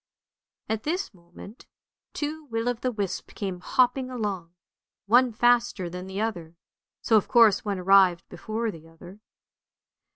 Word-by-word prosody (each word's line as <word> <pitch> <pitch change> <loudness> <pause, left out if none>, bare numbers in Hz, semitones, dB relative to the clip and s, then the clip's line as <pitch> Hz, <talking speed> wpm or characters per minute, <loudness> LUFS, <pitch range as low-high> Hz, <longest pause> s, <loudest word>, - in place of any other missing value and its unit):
" - - -67 0.2
At 220 -1 -2
this 350 - -3
moment 175 +5 -14 0.5
two 305 +1 -4
will 230 -3 -3
o' - - +1
the 250 +2 -3
wisps 200 -5 -5
came 190 -4 -4
hopping 255 +6 +1
along, 200 -8 -4 0.5
one 245 +4 +4
faster 235 -6 +1
than 180 +1 -7
the 190 +1 -5
other, 175 -7 -4 0.5
so 225 - +4
of 210 - 0
course 230 -5 +5
one 205 -2 -2
arrived 185 -1 +4
before 220 +1 -4
the 165 -2 -13
other. 175 +4 -14
210 Hz, 150 wpm, -26 LUFS, 185-240 Hz, 0.5 s, course